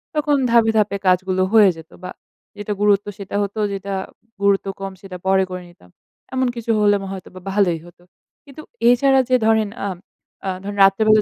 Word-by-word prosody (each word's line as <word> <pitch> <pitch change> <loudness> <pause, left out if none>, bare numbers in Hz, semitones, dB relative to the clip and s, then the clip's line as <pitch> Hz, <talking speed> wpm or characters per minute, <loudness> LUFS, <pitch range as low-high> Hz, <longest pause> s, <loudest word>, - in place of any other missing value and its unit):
তখন 295 -1 +2
ধাপে, 230 -1 +4
ধাপে 205 -1 +1
কাজগুলো 185 +1 +2
হয়ে 215 -3 +7
যেতো। 160 0 -14
বা 180 - -6 0.5
যেটা 205 0 -3
গুরুত্ব 205 -1 +3
সেটা 200 -1 -7
হতো, 200 +2 -5
যেটা 195 0 -5 0.5
গুরুত্ব 200 0 +2
কম 195 - -4
সেটা 190 -3 -9
পরে 190 0 +3
করে 180 0 -6
নিতাম। 90 - -21 0.4
এমন 260 0 +1
কিছু 235 -1 -3
হলে 205 -1 +4
ম - - -7
হয়তোবা 185 -1 -9
ভালোই 190 -4 +1
হতো। 175 0 -18 0.4
কিন্তু 280 +2 -11 0.3
এছাড়া 270 +2 +4
যে 255 - +4
ধরেন 220 -1 +2 0.2
আম 185 - -5 0.5
আ - - 0
ধরেন 205 +1 -6
রাত্রেবেলা 215 +2 +5
200 Hz, 175 wpm, -20 LUFS, 190-220 Hz, 0.5 s, হয়ে